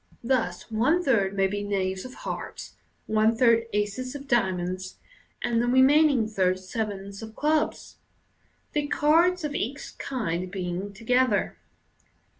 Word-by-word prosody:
Thus, 230 -6 -1
one 265 +11 +2
third 200 - +2
may 195 -1 +3
be 205 +1 -2
knaves 190 -1 -2
of 255 - -9
hearts, - - -6 0.3
one 220 +1 +2
third 230 -2 +4
aces 210 +6 -2
of 280 0 -8
diamonds, 185 -5 -1 0.5
and 235 -1 +1
the 240 - 0
remaining 260 -1 +5
third 185 -4 +1
sevens 200 0 -5
of 220 0 -9
clubs 305 +1 -1 0.4
— - - -41
the 295 -1 0
cards 335 +5 +3
of 295 -1 -2
each 275 +4 -4
kind 185 -9 -3
being 185 +1 -4
to 205 +4 -14
gether. 250 -3 +2
220 Hz, 140 wpm, -26 LUFS, 195-260 Hz, 0.5 s, remaining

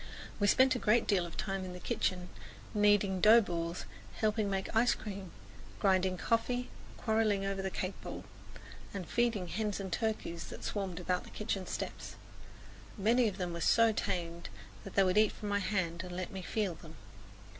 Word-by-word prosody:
We 205 - +3
spent 260 +5 +5
a 255 - -2
great 225 +2 +3
deal 185 -4 +2
of 170 - -11
time 195 -1 -2
in 185 -1 -6
the 180 - -8
kitchen, 180 0 -1 0.4
kneading 205 -3 +3
dough 220 +4 +9
balls, 170 -3 -3 0.3
helping 215 -1 +1
make 195 +2 -2
ice 235 +2 +4
cream, 195 -4 -7 0.5
grinding 185 -2 +2
coffee, 245 +4 0 0.3
quarreling 220 -3 +1
over 195 0 -1
the 190 - -2
cake 185 +1 -3
bowl, - - -7 0.7
and 185 -4 -4
feeding 235 -6 +1
the 170 - -9
hens 210 -1 -1
and 190 -3 -4
turkeys 215 -7 -2
that - - -9
swarmed 190 -4 -3
about 180 0 -1
the - - -12
kitchen 195 -3 -3
steps. - - -5 0.8
Many 230 +4 +3
of 200 -3 -3
them 180 -3 -3
were 170 - -5
so 230 +4 +5
tame 170 -5 -2 0.4
that 195 - -9
they 195 - +6
would 185 +2 +3
eat 215 -1 +4
from 210 - -6
my 205 0 +2
hand 185 -4 -1
and 180 -1 -7
let 185 0 -4
me 190 - -5
feel 200 0 -1
them. 160 0 -12
195 Hz, 185 wpm, -33 LUFS, 180-215 Hz, 0.8 s, dough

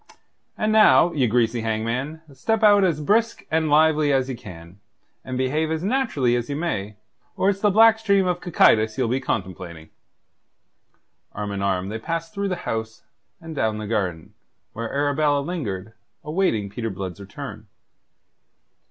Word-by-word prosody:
And 215 0 0
now, 175 -7 +5
ye 135 -5 +2
greasy 115 0 +1
hangman, 115 +8 -3
step 225 +10 -1
out 205 -2 +6
as 170 -5 +1
brisk 220 +9 +1
and 160 -1 +1
lively 155 0 +4
as 135 -1 +1
ye 130 - -3
can, 90 -5 -12 0.4
and 130 -1 -5
behave 150 +5 0
as 160 +1 -2
naturally 190 - +1
as 120 +1 -3
ye 140 - -2
may, 105 - -3 0.4
or 195 - +3
it's 195 - -6
the 210 - +4
black 220 +2 +6
stream 200 -3 +2
of 180 -1 -1
Cocytus 110 -9 +3
ye'll 130 -3 +1
be 125 +3 0
contemplating." 90 -9 -5 1.4
Arm 105 -1 -4
in 100 -1 -4
arm 95 -1 -1
they 110 +2 -4
passed 165 +5 -4
through 200 0 -2
the 180 - -1
house, 110 0 -4 0.4
and 165 -2 -9
down 110 -5 0
the 110 - -5
garden, 95 -7 -3 0.4
where 115 0 -5
Arabella 145 0 +1
lingered, 110 - -5 0.3
awaiting 150 - 0
Peter 115 +2 -4
Blood's 95 -2 -6
return. 100 0 -9
130 Hz, 160 wpm, -23 LUFS, 110-165 Hz, 1.4 s, out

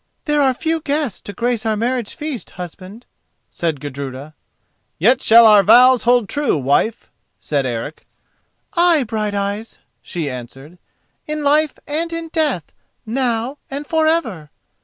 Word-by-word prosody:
"There 295 -1 +2
are 270 -2 +4
few 325 +4 -1
guests 290 - -2
to - - -7
grace 235 +2 -1
our 220 -2 0
marriage 240 0 -2
feast, 295 -6 -5
husband," 185 +6 -9 0.5
said 160 -4 -2
Gudruda. 140 +1 -7 0.6
"Yet 235 +10 +3
shall 230 +1 +7
our 210 -2 +7
vows 250 +4 +6
hold 240 -2 +3
true, 290 - 0
wife," 145 - 0 0.3
said 140 -3 -1
Eric. 120 +5 -6 0.7
"Ay, 340 -4 +4
Brighteyes," 210 -1 -3 0.2
she 170 -4 -5
answered, 135 +6 -9 0.5
"in 305 0 -3
life 295 0 +2
and 325 +3 -1
in 330 0 -4
death, 300 - 0 0.3
now 240 +2 -1
and 280 +2 -4
for 320 0 +1
ever!" 225 - -1
230 Hz, 135 wpm, -19 LUFS, 175-290 Hz, 0.7 s, shall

